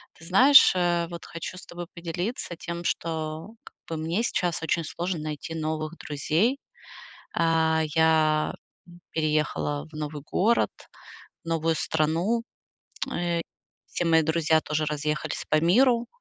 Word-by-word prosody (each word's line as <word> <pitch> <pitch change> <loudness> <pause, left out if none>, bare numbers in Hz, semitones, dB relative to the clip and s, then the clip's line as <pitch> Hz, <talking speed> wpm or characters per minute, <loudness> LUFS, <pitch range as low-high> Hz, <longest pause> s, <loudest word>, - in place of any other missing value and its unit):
Ты 165 - -15
знаешь, 255 +10 +7
э, 175 -1 +1
вот 170 -1 -8
хочу 170 +2 -7
с - - -11
тобой 175 0 -7
поделиться 175 +3 -4
тем, 170 0 -6
что 160 0 -3
как - - -15
бы 165 - -4
мне 165 +8 -1
сейчас 175 -8 -1
очень 165 +1 0
сложно 170 +2 -3
найти 155 +1 -5
новых 155 +1 -3
друзей. 165 - 0 0.8
А, 160 -1 +2
я 160 -1 +3 0.6
переехала 150 -1 -1
в - - -17
новый 150 -1 -5
город, 210 +10 +2 0.7
новую 165 0 0
страну. 165 +10 0 0.7
Э, 170 -1 -1 0.5
все - - -3
мои 165 -1 +4
друзья 160 0 +2
тоже 155 0 -1
разъехались 150 0 -2
по 155 - +3
миру. 235 +8 +4
165 Hz, 130 wpm, -26 LUFS, 155-175 Hz, 0.8 s, знаешь